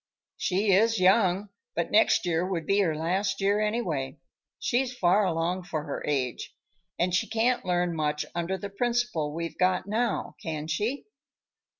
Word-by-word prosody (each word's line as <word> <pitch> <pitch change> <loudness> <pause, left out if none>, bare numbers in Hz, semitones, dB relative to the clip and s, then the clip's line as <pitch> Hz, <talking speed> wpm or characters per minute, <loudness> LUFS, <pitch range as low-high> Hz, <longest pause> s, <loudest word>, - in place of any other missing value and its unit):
"She 195 +2 +1
is 220 +3 +4
young, 190 +1 +3 0.3
but 170 - -1
next 210 -2 +4
year 170 -1 +1
would 180 -4 -2
be 195 +4 +2
her 170 -6 +2
last 185 +6 -1
year 200 +1 +2
anyway. 175 - -1 0.4
She's 250 0 -1
far 195 +2 +3
along 175 +1 -1
for 160 -4 -3
her 145 - -5
age. 130 -4 -2 0.4
And 175 +1 +1
she 180 - +1
can't 230 +3 +1
learn 175 -1 0
much 150 -1 -1
under 175 +2 -2
the 200 0 -7
principal 235 -8 0
we've 165 +2 -5
got 185 0 +2
now, 225 +3 -1
can 155 -2 -4
she?" 210 - -2
185 Hz, 160 wpm, -27 LUFS, 165-210 Hz, 0.4 s, is